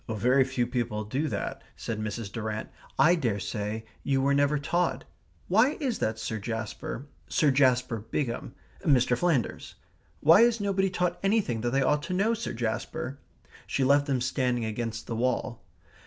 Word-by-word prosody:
"Very 125 +5 +3
few 130 -2 -1
people 120 -4 -2
do 130 +9 -1
that," - - -3
said 110 -2 -4
Mrs. 110 -1 -4
Durrant. 110 -1 -4 0.3
"I 155 +6 +6
daresay 105 - -2 0.2
you 135 -1 +1
were 140 +1 +2
never 145 +1 +3
taught. 145 -2 0 0.4
Why 225 - +3
is 260 -7 -1
that, 110 0 0
Sir 110 0 -3
Jasper? 110 +4 -5 0.2
Sir 155 -6 +3
Jasper 125 -3 +3
Bigham 115 +3 -3 0.3
Mr. 125 -4 +4
Flanders. 145 -3 -1 0.4
Why 165 +7 +7
is 235 -1 +4
nobody 195 -1 +1
taught 180 -1 -1
anything 195 - +1
that 120 - 0
they 135 +2 +2
ought 150 +1 +2
to 175 +4 -4
know, 210 +5 +2
Sir 230 0 -3
Jasper?" 125 +5 -3 0.5
She 135 - 0
left 140 +2 +4
them 135 -3 0
standing 125 -2 0
against 115 +1 -4
the 115 - -4
wall. 120 0 -1
130 Hz, 160 wpm, -28 LUFS, 115-155 Hz, 0.5 s, Why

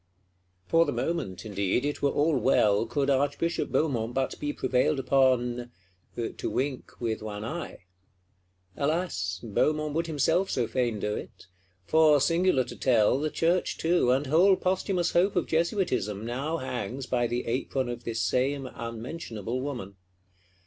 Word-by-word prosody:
For 165 - +4
the - - -1
moment, 145 - -3
indeed, 100 +4 0
it 145 - -2
were 140 - +3
all 150 +2 +2
well, 115 -5 +3
could 135 +4 0
Archbishop 145 +5 0
Beaumont 120 -6 0
but 135 0 -1
be 145 0 -2
prevailed 130 +2 +1
upon—to 120 -7 -1
wink 135 0 -3
with 115 -2 -2
one 105 0 -5
eye! 155 - -6 0.9
Alas, 140 - -1
Beaumont 150 +7 0
would 165 +2 -1
himself 165 +5 +1
so 125 - 0
fain 120 -2 -1
do 105 +1 -1
it: 105 -2 -8 0.4
for, 155 -2 +5
singular 165 -2 +3
to 120 - -9
tell, 120 0 +3
the 155 +1 -1
Church 170 +4 0
too, 165 -6 +2
and 130 +3 +2
whole 175 +8 +5
posthumous 185 -1 0
hope 185 +3 +2
of 180 - +1
Jesuitism, 160 - 0
now 135 +7 -2
hangs 125 -1 -4
by 120 -2 0
the 120 +1 -2
apron 130 +2 -1
of 120 0 -5
this 115 -1 -2
same 135 +2 0
unmentionable 115 - -5
woman. 120 -9 -5
130 Hz, 145 wpm, -28 LUFS, 115-155 Hz, 0.9 s, for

